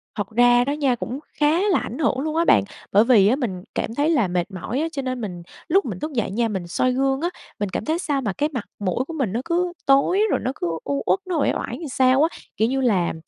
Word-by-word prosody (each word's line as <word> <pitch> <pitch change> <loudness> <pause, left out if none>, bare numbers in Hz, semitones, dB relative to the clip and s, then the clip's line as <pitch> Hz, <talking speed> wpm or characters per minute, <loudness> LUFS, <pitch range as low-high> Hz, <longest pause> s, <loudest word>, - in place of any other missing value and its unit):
Thật 205 -3 -3
ra 245 +2 +4
đó 280 - 0
nha, 275 -4 +1
cũng 250 +3 -5 0.2
khá 300 +3 +3
là - - +3
ảnh 240 - -6
hưởng 280 -4 +1
luôn 310 +3 -2
á 335 +1 +2
bạn, - - +5 0.3
bởi 205 +3 +6
vì 225 -5 +5
á, 240 - +4
mình 195 -10 -4
cảm 225 - -2
thấy 295 +3 +2
là 285 - +3
mệt 175 +2 -2
mỏi 190 +8 -4
á, 325 - 0
cho 280 -3 -3
nên 255 -2 -3
mình 180 -5 -6 0.2
lúc 375 -1 +3
mình 195 -7 -5
thúc 310 - -4
dậy 230 -6 -1
nha, 230 +3 +1
mình 190 -5 -4
soi 255 +8 +1
gương 270 +2 +1
á, 345 - 0 0.3
mình 205 - -1
cảm - - -4
thấy 320 +2 0
sao 285 -6 -1
mà 215 -5 -2
cái 295 +9 0
mặt 235 -5 -3
mũi 205 +6 -1
của 330 - -6
mình 265 -11 -1
nó 235 - -1
cứ 350 +1 0
tối 275 +9 +4
rồi - - +2
nó 255 - 0
cứ 175 - -3 0.2
u 280 0 -2
uất, - - +2
nó 355 -3 -1
uể - - +2
oải - - -4
làm 320 - -6
sao 260 +2 +3
á, 330 - -1 0.2
kiểu 220 - +3
như 265 +1 0
là, 195 -9 +2
255 Hz, 275 wpm, -22 LUFS, 215-300 Hz, 0.3 s, bởi